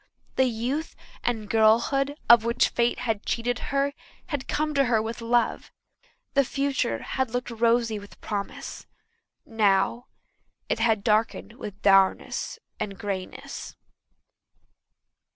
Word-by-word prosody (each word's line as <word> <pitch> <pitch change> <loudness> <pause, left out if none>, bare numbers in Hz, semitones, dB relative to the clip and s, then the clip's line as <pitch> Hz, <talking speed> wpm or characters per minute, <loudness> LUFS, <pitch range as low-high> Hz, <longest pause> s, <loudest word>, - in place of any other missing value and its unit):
The 260 - +4
youth 250 +7 -2 0.3
and 225 -3 -1
girlhood 235 +6 +3
of 235 -1 +8
which 235 +2 +2
fate 240 0 +1
had 225 -4 -1
cheated 245 +1 -1
her 280 0 +1 0.4
had 290 -4 -3
come 305 0 0
to 280 -1 +3
her 235 -3 +3
with 225 +2 -4
love; 235 0 0 0.6
the 275 - +5
future 275 - -1
had 265 -2 -1
looked 245 +1 -3
rosy 230 -1 +2
with 200 0 -14
promise; 205 -2 -5 0.6
now 215 +2 +1 0.6
it - - -1
had 225 -3 +2
darkened 215 +1 +1
with 210 -4 -8
dourness 195 -1 +3 0.2
and 200 -2 -4
greyness. 190 -2 -6
230 Hz, 120 wpm, -26 LUFS, 215-250 Hz, 0.6 s, of